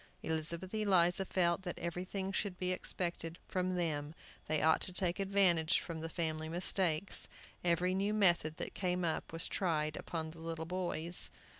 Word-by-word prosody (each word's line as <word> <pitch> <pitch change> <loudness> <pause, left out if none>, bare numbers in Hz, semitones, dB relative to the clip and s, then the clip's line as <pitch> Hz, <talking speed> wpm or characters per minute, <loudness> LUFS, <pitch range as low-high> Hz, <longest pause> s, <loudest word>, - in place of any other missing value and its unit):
Elizabeth 165 +4 -2
Eliza 190 -3 +3
felt 175 -1 +1
that 180 -2 -5
everything 185 +3 -3
should 195 -1 -2
be 180 0 -1
expected 170 -2 -3
from 185 0 -1
them; 155 -3 -2 0.3
they 155 -1 +1
ought 160 +1 +4
to - - +2
take 180 0 0
advantage 190 -4 +3
from 165 -2 -6
the 165 - -4
family 160 -1 -2
mistakes. 175 0 +1 0.4
Every 175 +1 +2
new 195 +2 +1
method 175 -7 +3
that - - -3
came 180 -2 -1
up 160 - -2
was 165 0 -1
tried 155 -5 0
upon 160 -2 -4
the 165 - -13
little 165 0 -4
boys. 175 -1 +3
175 Hz, 160 wpm, -35 LUFS, 160-185 Hz, 0.4 s, ought